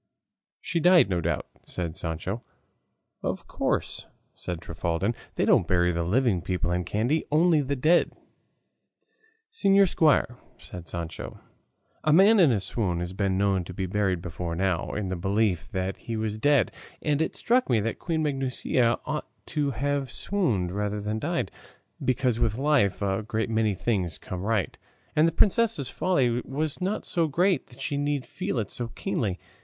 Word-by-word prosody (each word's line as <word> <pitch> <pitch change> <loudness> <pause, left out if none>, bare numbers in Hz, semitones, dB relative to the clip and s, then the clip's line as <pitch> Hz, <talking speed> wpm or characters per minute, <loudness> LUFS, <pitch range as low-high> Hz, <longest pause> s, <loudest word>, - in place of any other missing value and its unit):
"She 170 - -1
died, 175 - +5
no 90 -2 +1
doubt," 85 +1 -1 0.2
said 85 -3 -4
Sancho. 90 +5 -4 0.8
"Of - - -3
course," - - -2 0.3
said 90 -2 -5
Trifaldin; 85 +5 -2 0.2
"they - - +1
don't - - +4
bury 90 -1 +2
living 90 +4 +1
people 85 0 -1
in 90 0 0
Kandy, 120 - 0
only 160 0 +4
the 140 0 -1
dead." 155 +7 +3 1.4
"Señor 195 - +4
Squire," 145 -8 +2 0.2
said 85 -2 -10
Sancho, 85 -1 -6 0.6
"a 155 - +3
man 200 +7 +6
in 165 -7 +6
a 110 - +2
swoon 95 -3 -1
has 90 +1 -4
been 95 -1 0
known 95 -2 +2
to 90 +1 -9
be 95 - -2
buried 95 -2 0
before 85 -1 -4
now, 90 -1 0
in 105 -3 -2
the 95 - -2
belief 95 0 0
that 95 -1 -2
he 115 -1 -5
was 110 -1 -2
dead; 145 -4 +3 0.3
and 150 0 +1
it 160 - -1
struck 245 - +2
me 120 -3 +4
that 110 +2 -2
Queen 160 -2 -1
Maguncia 130 -4 +1
ought 150 0 -3 0.2
to 150 -2 -1
have 140 +1 -1
swooned 125 - 0
rather 105 +1 -2
than 105 +1 -2
died; 145 - -2 0.5
because 125 -2 +1
with 115 -2 +1
life 135 -9 +2
a 95 +1 0
great 110 +1 -2
many 110 -2 +1
things 95 -5 -1
come 90 -1 -6
right, 105 -1 -1 0.4
and 155 +2 +5
the - - +1
princess's 205 - +2
folly 125 -10 +1
was 150 +4 -3
not 195 +4 -1
so 165 -2 +1
great 180 +5 +1
that 125 +1 -17
she 140 +1 -2
need 145 -2 -1
feel - - -4
it 105 -4 -2
so 120 - -3
keenly. 105 - -2
115 Hz, 165 wpm, -27 LUFS, 95-145 Hz, 1.4 s, man